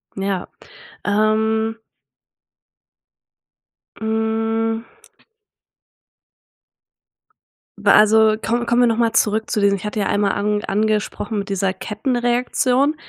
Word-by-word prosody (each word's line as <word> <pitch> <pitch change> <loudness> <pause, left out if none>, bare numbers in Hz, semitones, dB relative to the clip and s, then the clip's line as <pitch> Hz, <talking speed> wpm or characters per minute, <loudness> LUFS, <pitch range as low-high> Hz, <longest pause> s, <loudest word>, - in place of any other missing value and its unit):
Ja. 195 -1 -3 0.6
Ähm 220 +2 +1 2.2
hm 225 0 -1 2.9
Bei - - +3
also, 215 0 +5
komm 235 +2 -2
kommen 240 +1 +3
wir 245 - +5
noch 225 -1 0
mal 230 -1 +1
zurück 220 +1 +1
zu - - 0
diesen 200 -1 +2
ich 195 - -10
hatte 210 +1 -3
ja 200 - 0
einmal 205 0 +1
an 210 +1 -1
angesprochen 215 0 -1
mit 200 - -6
dieser 195 -1 -1
Kettenreaktion. 245 +6 0
220 Hz, 100 wpm, -20 LUFS, 205-225 Hz, 2.9 s, also